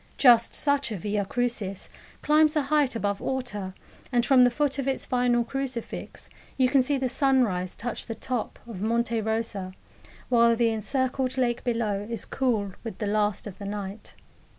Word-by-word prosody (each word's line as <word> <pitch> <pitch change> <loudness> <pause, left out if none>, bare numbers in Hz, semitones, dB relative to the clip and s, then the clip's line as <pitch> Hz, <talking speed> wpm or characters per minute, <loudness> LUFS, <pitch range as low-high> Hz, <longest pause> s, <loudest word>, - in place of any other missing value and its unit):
Just 240 -3 +5
such 285 -4 +1
a 210 - -3
Via 205 +2 -1
Crucis 215 -4 -2 0.4
climbs 305 0 +4
the 300 - +2
height 280 -2 +2
above 200 -3 -1
Orta, 210 -8 -4 0.4
and 240 -1 +2
from 270 -2 +5
the 245 - +7
foot 280 +2 -1
of 275 - -2
its 270 - 0
final 245 -2 +2
crucifix 260 -1 -5 0.3
you 255 -1 +4
can 270 0 +4
see 275 +2 +1
the 265 -1 0
sunrise 245 -9 +1
touch 240 +1 -4
the 225 - -4
top 245 +1 -3
of 220 -6 -8
Monte 230 +1 0
Rosa, 220 -4 -2 0.5
while 235 -1 +4
the 230 0 +2
encircled 260 +3 -1
lake 240 -2 0
below 215 -4 -1
is 230 -3 -2
cool 225 -7 0
with 225 - -6
the 210 - -3
last 210 -1 0
of 205 -4 -9
the 200 - -6
night. 200 0 -6
235 Hz, 175 wpm, -26 LUFS, 210-260 Hz, 0.5 s, the